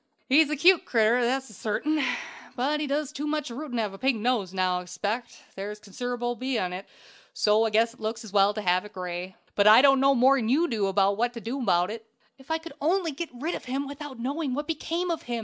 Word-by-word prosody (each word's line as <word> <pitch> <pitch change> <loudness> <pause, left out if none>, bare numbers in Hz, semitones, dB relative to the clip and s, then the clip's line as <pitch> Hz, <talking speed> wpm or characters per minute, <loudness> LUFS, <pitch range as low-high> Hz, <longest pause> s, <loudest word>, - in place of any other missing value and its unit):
"He's 295 +3 +5
a 305 - 0
cute 345 +4 +5
critter, 235 +1 +2
that's 255 -2 -1
sartain; 295 +10 -1 0.5
but 280 +4 0
he 300 - -2
does 285 0 -1
too 295 +2 -4
much 300 -4 -2
rootin' 265 +1 -6
to 225 - +1
have 205 -2 -4
a 195 - -11
pink 265 -3 +1
nose 215 -4 0
now, 185 -1 0
I - - -6
expect; 205 +7 -5
there's 205 +2 -6
consider'ble 240 +3 -4 0.2
on 180 -1 -2
't, 185 +2 -7 0.5
so 215 +1 +3
I - - +1
guess 225 +2 +2
it 255 - -22
looks 220 +1 -4
as 210 -3 -11
well 200 0 +5
to 215 - -4
have 180 0 +2
it 210 +1 -12
gray. 180 0 -5 0.2
But 205 0 +3
I 220 +5 +8
don't 275 -1 +6
know 275 +1 +4
no - - 0
more'n 255 -2 +4
you 315 +7 +3
do 210 - 0
what 200 +5 +1
to 235 - -6
do 235 +5 -4
abaout 180 -5 +2
it." 225 0 -8 0.3
"If 265 - -18
I 320 - +1
could 325 -2 -10
only 335 +2 +1
get 320 +4 -5
rid 280 +8 -4
of - - -6
him 270 +3 -2
without 285 -1 -8
knowing 270 +2 -2
what 295 +1 -3
became 335 +3 -2
of 330 - -3
him!" 240 -1 -1
240 Hz, 240 wpm, -26 LUFS, 210-285 Hz, 0.5 s, I